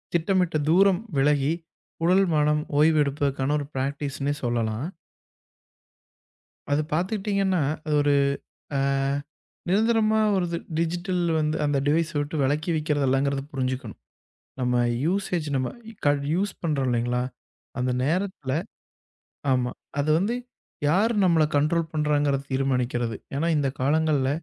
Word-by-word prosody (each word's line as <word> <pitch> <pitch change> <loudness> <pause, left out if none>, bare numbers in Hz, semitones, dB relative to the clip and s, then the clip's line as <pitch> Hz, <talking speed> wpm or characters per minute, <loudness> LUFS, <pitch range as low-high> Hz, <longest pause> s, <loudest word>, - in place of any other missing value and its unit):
திட்டமிட்ட 175 -1 +2
தூரம் 190 +2 +4 0.2
விலகி, 145 +1 +3 0.5
உடல், 185 +3 +5
மனம் 150 0 +2 0.2
ஓய்வெடுப்புக்கான 145 -3 +2
ஒரு 145 - -4
பிராக்டிஸ்ன்னே 140 +1 -2
சொல்லலாம். 120 - -1 1.8
அது 145 +2 +3
பாத்துக்கிட்டீங்கன்னா, 195 +1 0 0.2
அது 155 - -1
ஒரு, 145 0 +3 0.6
அ - - +1 0.9
நிரந்தரமா, 220 +2 +3 0.2
ஒரு 185 -2 +1
இது, 170 - -2 0.2
டிஜிட்டல் 175 +2 -1 0.2
வந்து 155 +1 0
அந்த 145 -1 +1
டிவைஸ் 160 +2 +2
விட்டு 145 +3 -2
விலக்கி 150 +5 0
வைக்கிறதுல்லங்கிறத 140 -2 +1
புரிஞ்சுக்கணும். 130 -3 -3 0.6
நம்ம 125 -1 +2 0.2
யூஸேஜ் 180 -2 0
நம்ம 130 -1 0 0.4
க - - +7 0.3
யூஸ் 195 +3 0
பண்றோம் 145 -6 0
இல்லைங்களா? 120 +1 0 0.6
அந்த 125 0 0
நேரத்துல 175 -3 -1 1.0
ஆமா. 125 -1 +1 0.3
அது 145 +2 0
வந்து 210 +6 0 0.5
யார் 200 +10 +3
நம்மள 170 -4 +4
கனஂடஂரோலஂ 160 +3 +2
பண்றாங்கனு 145 -2 +1
தீர்மானிக்கிறது. 125 -3 0 0.2
ஏன்னா 155 +4 0
இந்தக் 140 -2 -1
காலங்கள்ல, 145 -1 +2
150 Hz, 110 wpm, -25 LUFS, 135-175 Hz, 1.8 s, க